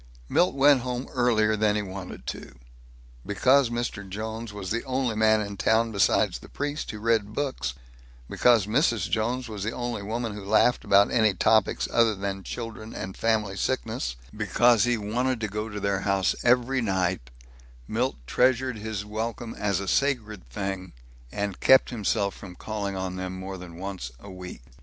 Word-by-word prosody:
Milt 175 - +2
went 140 -1 +5
home 125 +1 -3
earlier 110 -4 +3
than 105 -1 +2
he 105 - 0
wanted 95 -1 -8
to. 65 - -7 0.7
Because 125 +6 +3
Mr. 120 -4 -3
Jones 110 +3 -5
was 100 -3 -6
the 115 +1 -1
only 130 -3 -1
man 110 0 +4
in 100 -1 -5
town 115 +2 +2
besides 100 -3 +2
the - - -14
priest 145 +1 -3
who 105 - -5
read 110 -1 +1
books, 130 - -2 0.5
because 120 -5 +4
Mrs. 115 +1 +1
Jones 120 +3 0
was 105 -3 -7
the 110 +2 -2
only 120 -3 -3
woman 115 +2 -3
who 105 -1 -7
laughed 110 +4 +3
about 100 +1 +5
any 110 -4 +3
topics 110 0 +2
other 115 -2 +4
than 95 0 -4
children 115 +1 -7
and 95 0 -5
family 110 -3 0
sickness, 60 -7 -2 0.2
because 115 +3 +3
he 120 -1 +2
wanted 120 +4 -1
to 110 - -1
go 105 +2 -4
to 105 -1 -5
their 100 -1 0
house 100 -1 +2
every 125 +2 +3
night, 95 - -1 0.6
Milt 125 +4 0
treasured 125 - +2
his 105 -1 -4
welcome 115 +2 -4
as 100 -3 -1
a 100 - -5
sacred 110 - 0
thing, 95 +5 -4 0.4
and 100 -2 -3
kept 130 -1 +5
himself 105 -3 0
from 90 -3 -11
calling 100 -2 -4
on 95 0 -3
them 95 0 -4
more 95 0 -6
than 85 -2 -10
once 95 -9 -5
a 100 - -11
week. 90 -7 -9
110 Hz, 170 wpm, -26 LUFS, 100-120 Hz, 0.7 s, went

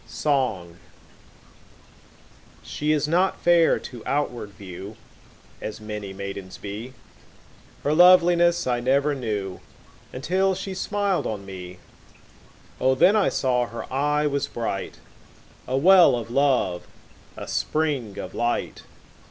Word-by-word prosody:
Song 110 - -1 1.9
SHE 150 +1 -2
is 150 -1 +1
not 180 +4 +1
fair 170 -1 +4
to 120 -3 -9
outward 125 -7 -2
view 100 +1 -10 0.6
As 110 - -6
many 105 -2 -6
maidens 100 -1 -7
be, 105 +5 -7 0.9
Her 145 - +1
loveliness 175 0 +5
I 125 -1 0
never 140 +4 +2
knew 105 -8 -4 0.5
Until 185 +8 0
she 190 +1 -5
smiled 200 0 -1
on 100 -3 -5
me; 90 -2 -9 1.0
O, 130 0 +3
then 185 +10 +5
I 210 - +3
saw 125 -2 0
her 115 0 -7
eye 150 +2 +1
was 140 -1 -1
bright, 110 -5 -4 0.7
5 130 - -1
A - - +2
well 180 -1 +6
of 115 -1 -5
love, 130 -10 +1 0.5
a - - -7
spring 145 -10 -1
of 95 - -6
light! 120 0 -2
130 Hz, 120 wpm, -24 LUFS, 105-160 Hz, 1.9 s, well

